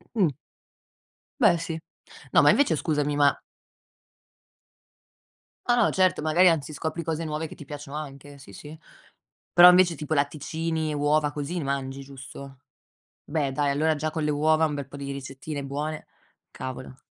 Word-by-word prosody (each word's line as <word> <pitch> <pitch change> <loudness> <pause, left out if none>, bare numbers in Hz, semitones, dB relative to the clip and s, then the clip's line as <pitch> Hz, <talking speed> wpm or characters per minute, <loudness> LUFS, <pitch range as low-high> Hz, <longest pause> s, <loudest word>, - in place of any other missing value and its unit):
mh. 180 -10 +2 1.1
Beh, 170 - +5
sì. 165 -1 -4 0.5
No - - +6
ma - - +6
invece 280 - +4
scusami, 150 -2 -1
ma 145 -1 +4 2.3
O 240 - +4
no, 240 -3 +3
certo, 185 -3 +2
magari 165 +4 +5
anzi 155 -2 -1
scopri 160 +3 -4
cose 165 0 -2
nuove 155 0 -3
che - - -11
ti - - -11
piacciono 145 0 -8
anche. 145 -1 -9
Sì, 135 -7 -14
sì. 150 +9 -11 0.8
Però 175 +1 +10
invece 180 -1 +5
tipo 150 +1 -4
latticini, 155 +2 -1
uova 145 0 +1
così 150 +4 -4
ne 170 - -2
mangi, 135 0 -3
giusto? 135 0 -11 0.6
Beh, 145 -3 -1
dai, 145 0 +1
allora 155 +3 +1
già 155 +1 -2
con 160 -1 -3
le 150 - +1
uova 155 +2 +3
un 150 -2 -2
bel 140 -2 -5
po' 140 - -10
di 140 0 -5
ricettine 140 +2 -6
buone, 150 +3 -4 0.5
cavolo. 130 0 -7
150 Hz, 160 wpm, -26 LUFS, 140-160 Hz, 2.3 s, Però